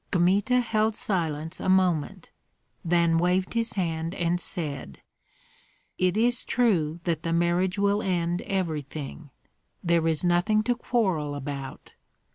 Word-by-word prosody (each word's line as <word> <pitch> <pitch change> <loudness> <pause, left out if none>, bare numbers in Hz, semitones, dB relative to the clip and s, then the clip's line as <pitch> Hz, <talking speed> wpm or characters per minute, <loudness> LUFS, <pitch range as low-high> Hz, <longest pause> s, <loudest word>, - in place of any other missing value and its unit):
Kmita 200 +7 +3
held 220 -2 +1
silence 160 -7 -2
a - - -2
moment, 185 -5 +1 0.5
then 170 -1 +3
waved 180 +2 +1
his 230 0 -1
hand 165 -2 -2
and 175 0 0
said: 140 - -5 1.0
"It 185 +2 +2
is 240 +2 +2
true 175 -10 +1
that 165 -3 -1
the 165 - -2
marriage 175 +2 +1
will 200 +1 +2
end 175 -2 -1
everything. 155 -5 -4 0.5
There 170 -2 +2
is 160 0 0
nothing 180 +5 +2
to 245 +2 +2
quarrel 190 -12 0
about. 140 -1 -7
175 Hz, 125 wpm, -26 LUFS, 160-200 Hz, 1.0 s, Kmita